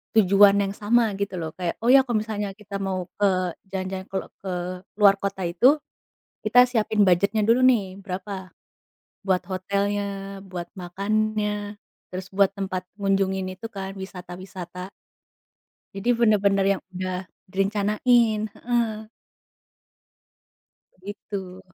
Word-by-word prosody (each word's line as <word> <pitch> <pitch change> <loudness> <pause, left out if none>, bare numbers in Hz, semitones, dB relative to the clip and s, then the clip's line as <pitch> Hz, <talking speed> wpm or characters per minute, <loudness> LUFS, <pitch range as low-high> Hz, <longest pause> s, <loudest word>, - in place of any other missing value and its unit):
tujuan 200 -1 +6
yang 195 0 -2
sama 225 +2 +2
gitu 200 -2 -2
lho. 160 -1 -4
Kayak, 175 -2 -2
oh 240 - +3
ya 270 0 +8
kalau 235 -3 +1
misalnya 210 -2 -3
kita 200 -1 -7
mau 185 -2 -2
ke 200 -1 +4 0.4
jalan-jalan, 190 0 -4
kalau 195 - -3
ke 190 -2 -4 0.5
luar 200 -1 +7
kota 195 -1 -3
itu, 245 - +4 0.7
kita 245 +4 +6
siapin 220 -3 +2
budgetnya 200 +5 +3
dulu 235 +3 +4
nih, 200 -6 +3
berapa 190 -1 -6 0.8
buat 185 -1 +2
hotelnya, 200 +1 -2
buat 180 -2 -6
makannya, 210 +2 -1 0.3
terus 185 +1 -7
buat 200 0 +4
tempat 185 -2 -3
ngunjungin 195 -1 0
itu 185 +5 -8
kan 195 -2 -6
wisata-wisata. 180 0 -8 1.0
Jadi 200 +5 -4
bener-bener 200 -4 +3
yang - - -22
udah 185 0 -2 0.3
direncanain, 210 +4 +2
heeh. 230 -3 -1 1.9
Begitu. 190 -1 -7
195 Hz, 120 wpm, -24 LUFS, 185-210 Hz, 1.9 s, ya